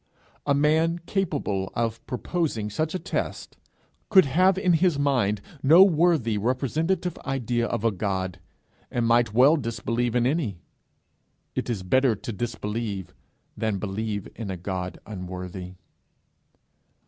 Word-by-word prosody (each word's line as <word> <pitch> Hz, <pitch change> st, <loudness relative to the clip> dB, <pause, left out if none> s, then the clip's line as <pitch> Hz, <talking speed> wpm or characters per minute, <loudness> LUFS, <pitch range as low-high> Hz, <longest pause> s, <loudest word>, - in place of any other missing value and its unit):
A 140 Hz, -, +4 dB
man 160 Hz, +3 st, +3 dB
capable 145 Hz, -, -1 dB
of 115 Hz, -1 st, -1 dB
proposing 125 Hz, -5 st, -2 dB
such 155 Hz, -, -1 dB
a -, -, +2 dB
test, -, -, -4 dB, 0.5 s
could 190 Hz, -5 st, +7 dB
have 185 Hz, +7 st, +3 dB
in 185 Hz, -2 st, +3 dB
his 170 Hz, -2 st, +3 dB
mind 125 Hz, -8 st, +1 dB, 0.2 s
no 160 Hz, +7 st, +8 dB
worthy 160 Hz, -, +3 dB
representative 155 Hz, -, -1 dB
idea 120 Hz, -3 st, -1 dB
of 115 Hz, -2 st, -3 dB
a 115 Hz, -, +4 dB
God, 95 Hz, -2 st, -2 dB, 0.5 s
and 120 Hz, -1 st, -1 dB
might 115 Hz, -1 st, +3 dB
well 130 Hz, +8 st, +5 dB
disbelieve 120 Hz, -1 st, -2 dB
in 120 Hz, -1 st, +3 dB
any: 130 Hz, -, 0 dB, 1.0 s
it -, -, -3 dB
is 105 Hz, -6 st, -2 dB
better 130 Hz, +5 st, +3 dB
to 120 Hz, +4 st, -6 dB
disbelieve 105 Hz, -3 st, -4 dB, 0.4 s
than 110 Hz, -3 st, -1 dB
believe 105 Hz, +1 st, -3 dB
in 110 Hz, -4 st, -5 dB
a 95 Hz, -, -3 dB
God 90 Hz, 0 st, -4 dB
unworthy. 90 Hz, -2 st, -7 dB
120 Hz, 130 wpm, -25 LUFS, 105-150 Hz, 1.0 s, no